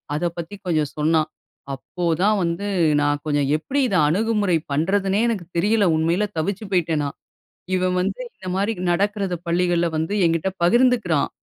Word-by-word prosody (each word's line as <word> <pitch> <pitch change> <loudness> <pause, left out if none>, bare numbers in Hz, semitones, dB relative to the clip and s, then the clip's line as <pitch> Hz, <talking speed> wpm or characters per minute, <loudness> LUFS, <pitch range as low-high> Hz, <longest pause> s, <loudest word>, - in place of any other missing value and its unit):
அதபத்தி 170 +3 -3
கொஞ்சம் 155 -5 0
சொன்னான். 155 +1 +2 0.4
அப்போ 175 +6 -5 0.2
தான் 210 +2 +3
வந்து 170 +4 -2 0.3
நான் 145 0 +1
கொஞ்சம் 145 -2 +1
எப்டி 270 - -2
இத 200 - -1
அணுகுமுறை 205 +1 +1
பண்றதுன்னே 195 +7 +1
எனக்குத் 185 -7 -3
தெரியல. 205 +4 +3
உண்மையில 170 +6 +1
தவிச்சு 195 +6 -2
போய்ட்டேன் 165 -4 +1
நான். 140 - -5 0.6
இவன் 185 0 +1
வந்து 195 - -2
இந்த 185 - -11
மாரி 200 +4 0 0.2
நடக்குறத 195 0 0
பள்ளிகள்ல 175 0 +1
வந்து 160 +5 -2
என்கிட்ட 165 +3 0
பகிர்ந்துக்கிறான். 225 - +3
175 Hz, 140 wpm, -22 LUFS, 160-200 Hz, 0.6 s, தான்